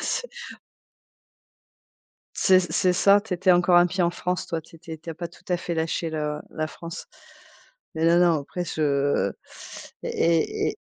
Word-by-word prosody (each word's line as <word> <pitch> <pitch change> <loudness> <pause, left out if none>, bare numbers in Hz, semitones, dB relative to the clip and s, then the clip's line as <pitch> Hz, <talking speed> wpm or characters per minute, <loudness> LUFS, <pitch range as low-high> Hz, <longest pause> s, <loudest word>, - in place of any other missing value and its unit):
C'est - - -2 2.1
c'est 185 -1 +5
c'est 180 +1 +1
ça, 200 +3 +5
tu 210 -3 -5
était 185 +1 +3
encore 175 0 +4
un 175 0 +5
pied 185 0 -1
en 170 - +3
France, 180 +1 -3
toi, 165 -2 -3
tu 160 - -18
étais 160 -1 -9
tu 165 +2 -10
as - - -4
pas 170 0 -5
tout 175 - -20
à 180 - +2
fait 170 - -4
lâché 160 0 -2
le 150 -1 -3
la 155 -1 -3
France. 170 +1 -9 0.9
Mais, 160 - 0
non, 170 +1 +5
non, 170 -4 +3
après 175 +5 -5
je 140 - 0 0.7
et 165 -1 +1
et - - -6
170 Hz, 170 wpm, -24 LUFS, 160-180 Hz, 2.1 s, c'est